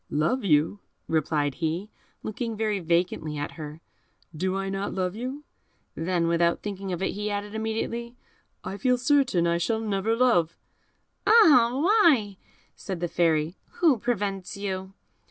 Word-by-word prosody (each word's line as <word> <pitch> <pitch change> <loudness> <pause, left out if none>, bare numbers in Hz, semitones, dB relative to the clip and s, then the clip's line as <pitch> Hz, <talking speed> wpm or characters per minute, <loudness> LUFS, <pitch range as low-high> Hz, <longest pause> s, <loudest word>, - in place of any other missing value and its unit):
"Love 170 - 0
you," 160 +2 +2 0.3
replied 150 -2 0
he, 170 +6 -2 0.3
looking 225 +1 -4
very 215 -2 0
vacantly 170 -3 0
at 145 - -3
her; 155 0 -9 0.5
"do 185 +4 -1
I 195 0 -2
not 195 +1 -3
love 185 0 -1
you?" 260 +6 -5 0.5
Then, 170 +1 0
without 170 0 +1
thinking 195 -2 -5
of 180 +1 -3
it, - - 0
he 210 +1 -3
added 205 0 -4
immediately, 225 +2 -3 0.5
"I 195 - -5
feel 250 +2 +2
certain 255 - +2
I 170 0 +1
shall 220 +6 0
never 215 0 0
love." 230 -10 +2 0.7
"Ah! 310 - +7
why?" 315 - +4 0.4
said 190 -4 -6
the 175 - -1
Fairy; 165 0 +1 0.2
"who 310 -9 +3
prevents 200 -5 -2
you?" 190 -1 -4
195 Hz, 145 wpm, -26 LUFS, 170-230 Hz, 0.7 s, Ah